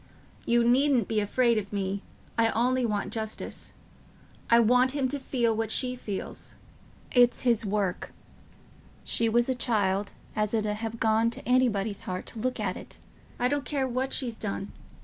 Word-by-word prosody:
"You 235 0 +3
needn't 255 -2 +3
be 220 -1 +1
afraid 230 +2 +2
of 200 -1 -8
me. 200 -1 -2 0.3
I 225 0 +3
only 250 +1 +2
want 205 -2 -2
justice. 220 -1 -5 0.8
I 235 - +7
want 250 +3 +4
him 275 -3 +1
to 285 - -2
feel 240 -4 0
what 225 -1 -1
she 250 +2 +2
feels. 205 -6 -6 0.6
It's 245 -1 +4
his 230 -4 +2
work... 195 -3 -1 0.9
she 230 -1 0
was 240 +1 +2
a 260 - +1
child 205 -5 0 0.3
as 215 +1 0
it 215 -1 0
'ud 210 0 -1
ha' 225 +1 -4
gone 225 +1 +3
t' - - -9
anybody's 225 -5 +1
heart 185 0 -5
to 225 - -8
look 255 +1 -2
at... 195 -4 -4 0.4
I 245 - +2
don't 285 +1 0
care 270 0 -1
what 255 +2 -2
she's 240 -4 0
done... 200 -1 -4
230 Hz, 170 wpm, -28 LUFS, 210-250 Hz, 0.9 s, I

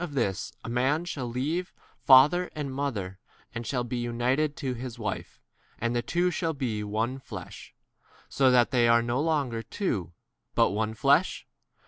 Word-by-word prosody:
7 175 - -3
For 145 - -10
this 100 -8 -1
cause - - -25
a - - -6
man 135 +7 +1
shall 140 -8 -4
leave 150 +10 -2
his - - -32
father 150 +7 +7
and 145 -3 -4
mother 105 -10 -3 0.3
and 115 -1 -5
shall 125 -1 0
8 120 - -9
be 120 -1 -2
joined 130 +6 0
to 130 -2 -3
his 125 0 -7
wife, 105 -4 -5 0.4
and 120 +1 -1
they 120 - +1
two 175 +7 0
shall 165 -1 -1
be 125 -7 -2
a 105 - -4
one 115 +5 -1
flesh: - - -10 0.5
so 135 -1 +3
that 125 -1 +4
they 120 -2 +4
are 115 0 +5
no 120 +3 0
longer 145 -8 0
two, 105 - -3 0.4
but - - +4
one 110 +2 0
9 110 - -8
flesh. 140 +9 +2
125 Hz, 195 wpm, -27 LUFS, 115-145 Hz, 0.5 s, father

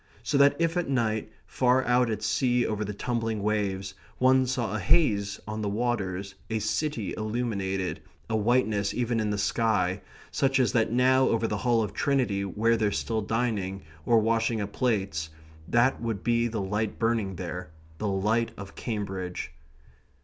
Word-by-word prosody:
So 115 - -1
that 140 0 +6
if 165 +1 +1
at 175 -5 -1
night, 110 -4 0
far 130 0 +2
out 120 0 +3
at 110 - -3
sea 125 -2 +2
over 105 -1 -1
the 105 - -4
tumbling 115 -1 -2
waves, 100 -2 -1 0.2
one 130 0 +4
saw 120 -4 -1
a - - -1
haze 105 - +2
on 110 0 -4
the 105 - -1
waters, 100 -4 -2 0.2
a 110 - 0
city 110 +2 -1
illuminated, 105 -4 -2 0.3
a 110 - -1
whiteness 110 -2 +1
even 120 -1 0
in 110 -1 0
the 105 - -1
sky, 100 -2 +1 0.3
such 135 0 +2
as 125 - +3
that 115 -3 +2
now 130 +2 +4
over 115 0 +1
the 105 - -2
Hall 120 0 +2
of 105 -2 -4
Trinity 120 -7 +1
where 110 +5 +1
they're 105 -2 +1
still 110 +2 -1
dining, 105 -4 -1 0.2
or 115 - +4
washing 115 +1 +1
up 100 0 -4
plates, 95 -10 -1 0.4
that 120 +5 +2
would 115 -4 -3
be 120 0 +2
the 110 -3 -3
light 105 +2 -2
burning 115 -4 0
there 90 0 -5 0.3
the 110 - -1
light 105 +4 +1
of 95 0 -9
Cambridge. 95 - -4
110 Hz, 170 wpm, -27 LUFS, 100-120 Hz, 0.4 s, that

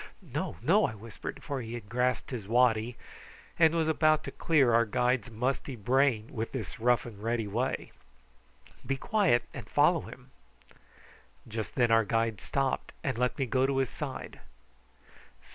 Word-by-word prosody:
"No, - - -3
no," - - +4
I 110 - -7
whispered, 110 +2 -8
for 140 -5 -3
he 115 0 -6
had 115 -4 -8
grasped 125 +3 0
his 115 -6 -5
waddy 120 0 +2 0.6
and 165 0 +5
was 160 -1 +1
about 155 -1 +3
to - - -6
clear 140 -8 +3
our 115 0 +5
guide's 125 +1 0
misty 130 +4 -2
brain 120 0 +1
in 115 0 -2
this 110 -10 -5
rough 120 +1 +3
and 105 -4 -10
ready 115 0 -1
way. 120 +6 -2 0.9
"Be 135 - -1
quiet 190 - +2
and - - -8
follow - - +4
him." - - -12 1.2
Just 110 -1 -5
then 120 -3 +3
our 115 0 +5
guide 115 0 0
stopped 135 -1 -1
and 135 - -1
let 125 0 0
me 135 - 0
go 130 +2 +2
to 135 -1 0
his 135 -2 0
side. 140 -3 -6
125 Hz, 160 wpm, -30 LUFS, 115-135 Hz, 1.2 s, and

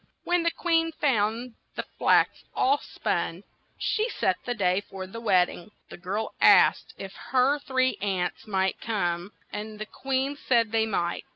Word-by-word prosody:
When 350 0 +2
the 335 - +2
queen 330 -1 +1
found 235 -4 0 0.2
the - - -3 0.2
flax - - +3
all 280 +2 +3
spun, - - -3 0.3
she 440 +2 0
set - - 0
the 245 - -2
day 185 -2 +1
for 190 -1 -6
the 230 +5 -9
wed 185 -5 +4
ding. 175 - -10 0.2
The - - -8
girl 195 +5 -3
asked - - +5
if 195 0 -8
her 265 +3 +1
three 260 -2 0
aunts 190 0 -2
might 190 -2 0
come, 180 -4 -2 0.2
and 215 +1 -5
the 215 - -5
queen 270 +4 -2
said 230 -6 +2
they 225 0 +2
might. 175 -5 -2
220 Hz, 165 wpm, -27 LUFS, 195-265 Hz, 0.3 s, asked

